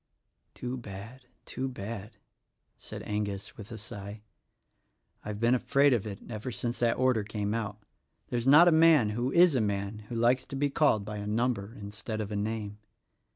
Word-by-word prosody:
"Too 125 +1 -4
bad, 115 +3 -9 0.2
too 130 - -3
bad," 110 -2 -7 0.6
said - - -9
Angus 105 -2 -3
with 105 -1 -10
a 115 - -6
sigh. 105 -1 -8 1.0
"I've 105 -1 -5
been 115 +2 +3
afraid 140 +2 +3
of 110 -3 0
it 100 -2 -7
ever 110 +2 -5
since 120 0 -3
that 115 -1 +2
order 130 -4 +2
came 105 0 -3
out. 105 -2 -4 0.5
There 120 - 0
is 120 - -4
not 150 +6 +8
a - - +7
man, 160 -8 +6
who 120 +4 -1
is 175 0 +6
a 130 - +2
man, 100 0 -2
who 120 - -4
likes 120 +3 +3
to - - -6
be 140 +1 0
called 125 -9 +3
by 105 0 -5
a 105 0 -5
number 115 -1 -1
instead 105 +2 -5
of 105 -1 -4
a - - -2
name. 105 0 -3
110 Hz, 185 wpm, -29 LUFS, 105-125 Hz, 1.0 s, not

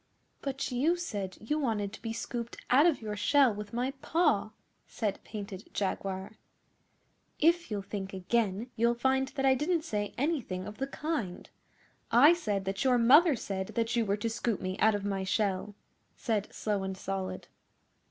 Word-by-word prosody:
'But 275 -1 -3
you 285 +8 +2
said 200 - -4
you 300 +8 -1
wanted 215 -7 -1
to - - -10
be 225 - -4
scooped 235 +1 -5
out 285 +6 +7
of 300 -9 +1
your 210 -1 -3
shell 265 +3 +4
with 205 0 -7
my 245 +3 -1
paw,' 300 - +2 0.4
said 210 -4 -3
Painted 200 -2 -7
Jaguar. 195 +1 -3 1.0
'If 340 0 +3
you'll 205 -2 -3
think 195 -1 -5
again 210 +3 -1
you'll 235 +1 +2
find 265 +2 +1
that 270 - 0
I 265 - +6
didn't 315 +5 0
say 205 -9 -3
anything 250 - -1
of 210 +3 -9
the 270 - -1
kind. 275 - -4 0.6
I 285 +8 +8
said 210 - -2
that 195 +4 -1
your 255 -2 +4
mother 285 +7 +6
said 190 -4 -4
that 230 0 0
you 235 - +3
were 200 -1 0
to 210 - -2
scoop 230 -2 -1
me 185 0 -3
out 220 0 +4
of 205 -1 -3
my 195 -1 -1
shell,' 195 +1 -1 0.4
said 215 -3 -1
Slow 205 -2 -1
and 190 0 -4
Solid. 190 -1 -4
220 Hz, 170 wpm, -30 LUFS, 200-265 Hz, 1.0 s, I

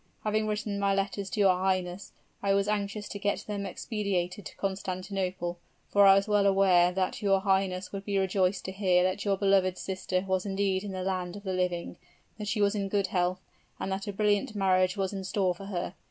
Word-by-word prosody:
Having 215 0 0
written 210 -1 -2
my 200 -1 +2
letters 195 0 -2
to 200 - -4
your 195 -2 +5
highness, 185 0 -1 0.3
I 195 -1 +2
was 200 0 +1
anxious 205 0 -2
to 200 - -6
get 205 0 -1
them 200 -1 -3
expedited 195 -2 -3
to - - -13
Constantinople, 185 -2 -3 0.3
for 200 -1 +6
I 195 - +9
was 195 +2 +2
well 205 -1 +3
aware 185 -3 +5
that 185 0 -2
your 195 -2 +3
highness 190 -1 0
would 195 0 -6
be 200 -1 0
rejoiced 190 0 +1
to 190 - -3
hear 185 -2 +2
that 185 +2 0
your 200 -1 +2
beloved 190 -2 +3
sister 185 -1 -2
was 190 -1 +1
indeed 195 -1 0
in 200 -2 -5
the 185 -1 -3
land 185 -1 -2
of 205 - -9
the 190 -2 -2
living, 180 -2 -2 0.4
that 210 - -4
she 210 0 0
was 200 0 +3
in 200 -2 -2
good 200 0 +1
health, 180 0 +1 0.4
and 190 - -3
that 195 +1 -3
a - - -1
brilliant 205 +1 +1
marriage 185 -1 +2
was 195 0 -1
in 195 -1 -4
store 190 -1 +1
for 195 +3 -10
her. 180 -3 -3
195 Hz, 210 wpm, -29 LUFS, 185-200 Hz, 0.4 s, I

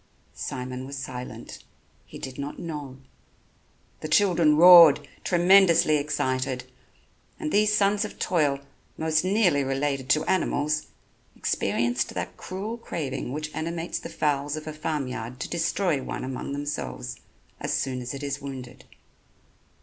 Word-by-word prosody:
Simon 130 0 -5
was 140 0 -6
silent, 125 -1 -7 0.4
he - - -10
did 130 0 -8
not 140 +1 -5
know. 150 -6 -6 1.0
The - - -5
children 170 -4 +4
roared, 170 -3 +9 0.2
tremendously 175 -3 +5
excited; 130 -3 -1 0.8
and 310 -2 -3
these 210 +1 +3
sons 205 +1 +2
of 215 - -7
toil, 145 -6 +1 0.4
most 160 0 +1
nearly 185 -7 +3
related 135 0 -2
to 155 +1 +3
animals, 150 -4 0 0.5
experienced 120 +1 -1
that - - -4
cruel 205 +5 -6
craving 135 - -4
which 155 +2 -5
animates 165 +1 -3
the - - -8
fowls 145 -1 -1
of 155 - -7
a 155 - -5
farm 150 -2 -2
yard 125 0 -6
to - - -2
destroy 170 -2 0
one - - -5
among 130 +1 -5
themselves 145 +1 -4 0.4
as - - -3
soon 130 -2 -1
as 125 +2 -5
it 140 - -7
is 140 -1 -3
wounded. 130 -3 -8
150 Hz, 135 wpm, -26 LUFS, 135-170 Hz, 1.0 s, roared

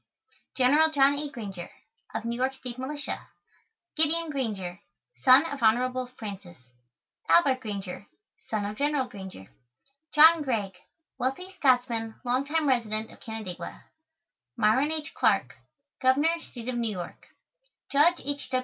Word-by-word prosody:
General 290 +5 +5
JOHN 285 -1 +3
A. 295 0 -3
GRANGER 200 -9 -7 0.5
Of - - -3
New 235 0 -2
York 260 +2 0
State 255 -2 -8
Militia 285 +2 -5 0.7
GIDEON 320 +1 +2
GRANGER 205 -10 -3 0.4
Son 265 +4 +7
of 285 -5 -5
Hon. 250 +3 +2
Francis 195 -5 -8 0.7
ALBERT 275 -7 +5
GRANGER 200 -4 -6 0.4
Son 215 -2 -1
of 210 +1 -5
General 285 -2 +1
Granger 190 - -10 0.6
JOHN 320 +2 +8
GREIG 215 -9 -2 0.4
Wealthy 270 +10 -2
Scotsman 245 -7 +1
long 255 +3 +1
time 310 +1 0
resident 225 -4 0
of - - -16
Canandaigua 190 -6 -7 0.7
MYRON 260 +8 +3
H. 315 0 -4
CLARK - - +1 0.4
Governor, 290 +6 +3
State 240 0 -7
of 250 - -2
New 230 -2 0
York 175 -1 -8 0.6
JUDGE 325 +5 +4
H. 285 0 -4
255 Hz, 130 wpm, -27 LUFS, 220-290 Hz, 0.7 s, JOHN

